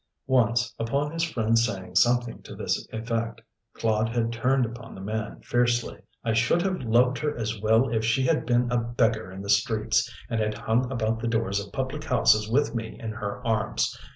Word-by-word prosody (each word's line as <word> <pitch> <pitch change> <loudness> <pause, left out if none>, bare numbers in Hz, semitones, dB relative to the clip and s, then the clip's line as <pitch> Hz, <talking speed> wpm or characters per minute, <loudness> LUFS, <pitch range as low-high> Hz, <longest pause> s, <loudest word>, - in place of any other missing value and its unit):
Once, 120 -3 +2
upon 140 +6 -1
his 165 0 -2
friend 115 -8 +1
saying 95 -6 -2
something 120 +4 +2
to - - -10
this - - -2
effect, 115 0 -3 0.4
Claude 110 0 +1
had 115 0 -1
turned 125 +3 +2
upon 115 0 -9
the - - -9
man 110 +3 -4
fiercely: 120 -1 +1 0.2
"I 115 - 0
should 120 +10 +2
have 190 -4 -1
loved 125 +2 +3
her 150 -2 -2
as 110 -2 -3
well 110 +4 +4
if 110 -1 0
she 115 +4 +2
had 130 - +1
been 120 0 +2
a 120 - +2
beggar 115 -3 0
in 95 +1 -8
the - - -7
streets, 105 +2 +2 0.2
and 115 - -1
had 110 0 -1
hung 125 +3 0
about 115 -3 -1
the 115 - -2
doors 115 -3 0
of 100 - -14
public 135 +5 -3
houses 110 -6 +3
with 130 0 +2
me 115 -2 -5
in 115 -3 -4
her 100 -2 -5
arms. 110 -1 0
115 Hz, 195 wpm, -26 LUFS, 110-125 Hz, 0.4 s, well